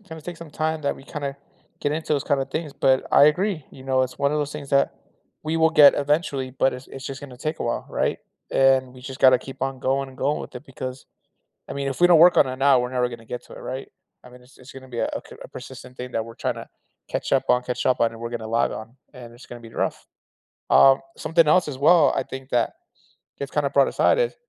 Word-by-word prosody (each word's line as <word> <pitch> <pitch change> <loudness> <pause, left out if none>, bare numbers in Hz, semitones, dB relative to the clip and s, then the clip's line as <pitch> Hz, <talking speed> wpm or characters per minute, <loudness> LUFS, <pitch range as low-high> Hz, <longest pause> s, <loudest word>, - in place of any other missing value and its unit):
It's 205 - -26
gonna 160 -1 -8
take 175 +2 -8
some 165 -2 -11
time 155 +1 -2
that 140 - 0
we - - -14
kinda 140 -1 -5 0.4
get 145 - 0
into 155 0 -2
those 145 -2 0
kind 140 -2 +1
of 135 - -4
things, 155 -3 -4
but 130 -1 +2
I - - +7
agree, 175 +1 +1
you 130 - -13
know, 130 -1 +2
it's 130 0 -4
one 140 0 +1
of 150 - 0
those 145 -1 -2
things 145 -2 -8
that 140 0 +3 0.5
we 160 +1 -2
will 160 0 +4
get 150 -3 +8
eventually, 145 -2 -1
but 130 +1 +1
it's 125 +1 -9
it's 135 -1 -8
just 135 -1 -6
gonna 130 -4 -10
take 155 +4 -4
a - - -3
while, 120 - -2
right? - - -1 0.3
And, 130 -1 +3
we 130 - -13
just 130 +1 -8
gotta 130 -1 +7
keep 135 0 -10
on 135 -1 -2
going 135 +1 0
and 130 - -15
going 145 +3 0
with - - -9
it 125 - -9
because 130 0 -7 0.6
I - - -4
mean, 140 0 -3
if 135 +4 -4
we 175 - +7
don't 175 -3 +6
work 175 +2 +7
on 135 - +6
it 130 - -5
now, 135 -2 +5
we're 125 0 -3
never 125 -1 +1
gonna 115 -1 -10
get 120 +2 -6
to - - -14
it, - - -10
right? 130 +1 -6 0.4
I - - -14
mean, 125 0 -16
it's 125 +2 -21
it's 130 +1 -14
gonna 130 0 -12
be 120 -2 -5
a - - 0 0.2
c - - -11
a - - -9
persistent 125 0 -11
thing 125 0 -7
that 115 -1 -1
we're 115 0 -11
tryna - - -3 0.4
catch - - -3
up - - +3
on, 125 - +4
catch 125 0 -3
up 130 - +2
on, 115 -1 +3
and 115 - -11
we're 115 0 -5
gonna 115 -2 -5
log 115 +1 +1
on, 115 +3 -8 0.2
and 120 -3 -11
it's 120 - -14
gonna 120 -1 -10
be 115 - -11
rough. - - -3 0.6
Um, 135 0 +6 0.2
something 165 +1 +2
else 170 +2 +4
as 140 - -5
well, 165 +4 +5
I 135 - +1
think 130 0 -9
that 120 -2 +1 0.7
it's 140 -1 -5
kinda 145 -2 0
brought 140 0 +4
aside - - +2
is 485 0 0
135 Hz, 265 wpm, -23 LUFS, 125-150 Hz, 0.7 s, get